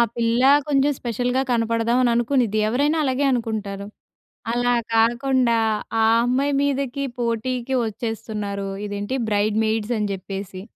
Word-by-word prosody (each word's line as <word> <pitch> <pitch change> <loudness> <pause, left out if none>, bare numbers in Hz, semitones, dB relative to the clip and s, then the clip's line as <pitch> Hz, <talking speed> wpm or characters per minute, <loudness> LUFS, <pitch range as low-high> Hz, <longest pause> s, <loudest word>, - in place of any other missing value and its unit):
పిల్ల 235 +1 +1 0.3
కొంచెం 280 0 +2
స్పెషల్‌గా 245 +2 -1
కనపడదాం 230 0 +1
అని 240 - +3
అనుకునిద్ది. 235 -3 +1
ఎవరైనా 285 +7 +1
అలాగే 265 +1 0
అనుకుంటారు. 210 -4 -3 0.7
అలా 245 0 +1 0.2
కాకుండా, 235 +1 +2 0.5
ఆ - - +4 0.2
అమ్మాయి 270 +4 +1
మీదకి 280 -1 -1
పోటీకి 240 +2 -2
వచ్చేస్తున్నారు, 210 -3 -4 0.2
ఇదేంటి 205 +4 -3
బ్రైడ్ 210 +1 +1
మెయిడ్స్ 220 +1 -1
అని 210 -1 -1
జెప్పేసి. 195 0 -6
235 Hz, 115 wpm, -22 LUFS, 215-255 Hz, 0.7 s, ఆ